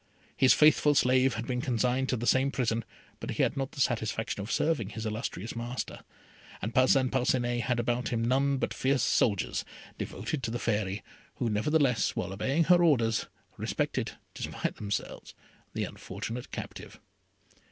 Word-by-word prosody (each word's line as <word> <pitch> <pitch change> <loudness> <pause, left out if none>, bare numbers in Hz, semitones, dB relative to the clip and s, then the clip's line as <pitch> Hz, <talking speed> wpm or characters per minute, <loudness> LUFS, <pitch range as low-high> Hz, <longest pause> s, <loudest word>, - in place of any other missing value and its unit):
His 130 - +5
faithful 150 -1 +5
slave 130 -1 +4
had 115 +1 -4
been 125 -1 -2
consigned 125 +1 0
to 125 - +1
the 115 - -3
same 130 +2 +3
prison, 115 -4 0 0.4
but - - -6
he - - +1
had - - +1
not 135 -1 -3
the - - -9
satisfaction 110 -4 0
of 100 - -5
serving 145 -11 +1
his 110 0 -6
illustrious 110 0 -4
master, 120 0 -4 0.6
and 110 +4 -4
Parcin 130 0 +4
Parcinet 120 -2 +1
had 125 -2 +1
about 120 +1 0
him 115 -1 0
none 135 +3 +2
but - - -2
fierce 135 0 +1
soldiers, 100 -5 +1 0.4
devoted 155 - -3
to 115 - -2
the 120 - -2
Fairy, 105 -4 -1 0.3
who 115 - -1
nevertheless, 130 +3 +2
while 95 - -3
obeying 135 +11 +1
her 175 +2 +5
orders, 115 -9 +3 0.3
respected, - - -2 0.2
despite - - -4
themselves, 100 -1 -4 0.4
the - - -1
unfortunate 120 +2 -6
captive. - - -8
125 Hz, 160 wpm, -29 LUFS, 115-135 Hz, 0.6 s, His